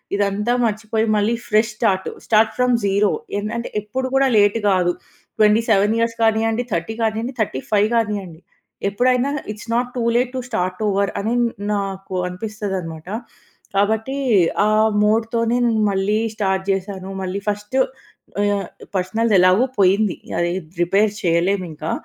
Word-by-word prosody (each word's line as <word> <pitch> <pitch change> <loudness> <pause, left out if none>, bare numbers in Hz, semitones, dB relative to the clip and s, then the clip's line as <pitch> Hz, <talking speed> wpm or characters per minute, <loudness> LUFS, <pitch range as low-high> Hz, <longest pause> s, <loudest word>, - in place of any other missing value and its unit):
ఇదంతా 205 +4 0
మర్చిపోయి 220 +1 -1
మళ్ళీ 210 +3 +2
fresh 215 0 +2
start. 190 -5 +1 0.2
Start 220 0 +3
from 250 -1 +3
zero. 200 +1 +2 0.3
ఎన్ 210 +1 -3
అంటే 235 - -4
ఎప్పుడు 260 +5 -3
కూడా 270 0 +4
లేట్ 205 +2 +4
కాదు. 180 -2 +2 0.5
27 215 0 +4
ఇయర్స్ 230 0 0
కానియండి, 225 +1 +2
30 170 +6 -2
కానియండి, 225 +3 -1
35 205 +5 +1
కానియండి 200 -7 -2 0.5
ఎప్పుడైనా, 250 +5 +1 0.2
it's 215 +2 -12
not 245 +1 0
too 235 - 0
late 250 0 +1
to - - -2
start 185 0 -2
over. 200 0 +1
అనే 225 +3 -1 0.4
నాకు 195 -1 -4
అనిపిస్తది 205 +1 -4
అనమాట. 160 0 -9 0.7
కాబట్టి, 220 +6 +1 0.5
ఆ - - +2 0.4
మూడ్‌తోనే 230 +2 +1
నేను 220 -2 +1
మళ్ళీ 200 +3 +1 0.2
స్టార్ట్ 190 -1 0
జేశాను. 195 0 -4
మళ్ళీ 185 +2 -3
ఫస్ట్ 210 +4 -4 0.7
ఆహ్, 205 -1 +1 0.3
పర్సనల్‌దెలాగో 190 +2 +3
పోయింది. 195 +1 +3 0.2
అది 175 0 +1 0.3
రిపేర్ 200 +4 +2
చేయలేము 180 +2 +1
ఇంకా. 155 +1 -5
210 Hz, 135 wpm, -20 LUFS, 195-225 Hz, 0.7 s, కూడా